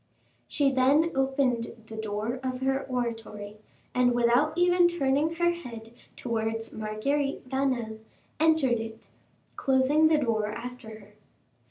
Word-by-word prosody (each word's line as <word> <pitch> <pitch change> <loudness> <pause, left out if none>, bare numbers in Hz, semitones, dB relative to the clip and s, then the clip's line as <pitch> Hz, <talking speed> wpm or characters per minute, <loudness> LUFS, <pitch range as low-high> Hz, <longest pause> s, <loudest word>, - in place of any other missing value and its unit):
She 280 -2 +2
then 275 +6 +3
opened 265 -3 0
the 220 - -9
door 220 +3 -3
of 255 -1 -3
her 270 +1 0
oratory, 225 -4 -4 0.4
and 250 -1 +3
without 245 +7 +2
even 355 0 +5
turning 310 -1 +1
her 345 +1 +2
head 235 -9 -9 0.2
towards 225 -1 -3
Marguerite 255 +7 -2
Vanel, 255 -5 -1 0.4
entered 310 -7 +3
it, 225 0 -8 0.5
closing 270 +3 +3
the 315 -1 +4
door 225 -7 0
after 245 +2 -7
her. 210 -1 -13
255 Hz, 125 wpm, -27 LUFS, 225-280 Hz, 0.5 s, even